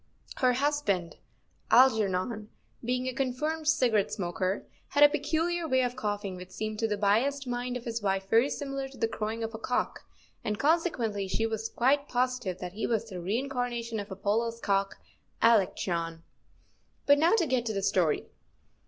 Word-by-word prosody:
Her 255 -1 +3
husband, 250 - 0 0.5
Algernon, 215 -3 +3 0.3
being 250 +2 -1
a 255 - -2
confirmed 300 +5 -2
cigarette 245 -10 +3
smoker, 185 +1 -2 0.2
had 285 - +4
a 290 - +9
peculiar 325 +3 -1
way 260 -3 +3
of 245 0 -2
coughing 205 -5 -3
which 180 0 -9
seemed 215 +2 -4
to 225 - +1
the 210 -1 -1
biased 240 +8 +2
mind 245 0 -2
of 240 - -11
his 230 -1 -3
wife 195 -1 -1
very 230 +7 +4
similar 275 -2 -4
to 265 -1 -14
the 225 - +1
crowing 225 +1 -3
of 225 0 -4
a 220 - -6
cock, 250 +2 -1 0.4
and 210 -1 -1
consequently 255 - +1
she 225 +4 0
was 220 0 -2
quite 280 +4 +2
positive 245 -7 -1
that 180 -1 -6
he 215 - -2
was 225 -1 -1
the 180 -2 -5
reincarnation 235 +2 -2
of 205 +1 -6
Apollo's 220 +4 -1
cock, 195 -2 0 0.4
Alectryon. 175 -7 +2 0.8
But 285 0 +6
now 330 +5 +4
to 370 -7 +2
get 250 -4 0
to 220 - -1
the 195 -1 -2
story. 175 -6 +2
230 Hz, 170 wpm, -29 LUFS, 205-260 Hz, 0.8 s, a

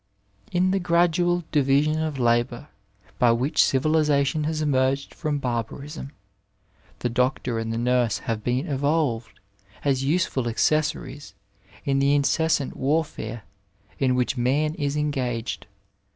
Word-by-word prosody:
In 180 +1 +2
the 195 - +1
gradual 175 0 +2
division 145 +2 +2
of 155 -3 -2
labour, 120 +3 0 0.5
by 120 -1 +5
which 130 +7 +2
civilisation 150 +1 +2
has 155 0 -1
emerged 135 -2 0
from 150 -3 -2
barbarism, 135 +4 -4 0.9
the 120 - -2
doctor 125 -1 0
and 115 0 -3
the 115 - -2
nurse 120 -2 +1
have 110 -2 -4
been 125 +6 0
evolved, 140 -6 -1 0.5
as 135 -2 +1
useful 140 -4 0
accessories 145 +2 -1 0.5
in 135 -1 +1
the 140 +1 +3
incessant 145 0 +1
war&ure 135 -6 -2 0.6
in 130 -2 +2
which 125 +1 0
man 140 +5 +1
is 145 -2 -2
engaged. 125 -8 -2
140 Hz, 125 wpm, -24 LUFS, 125-155 Hz, 0.9 s, by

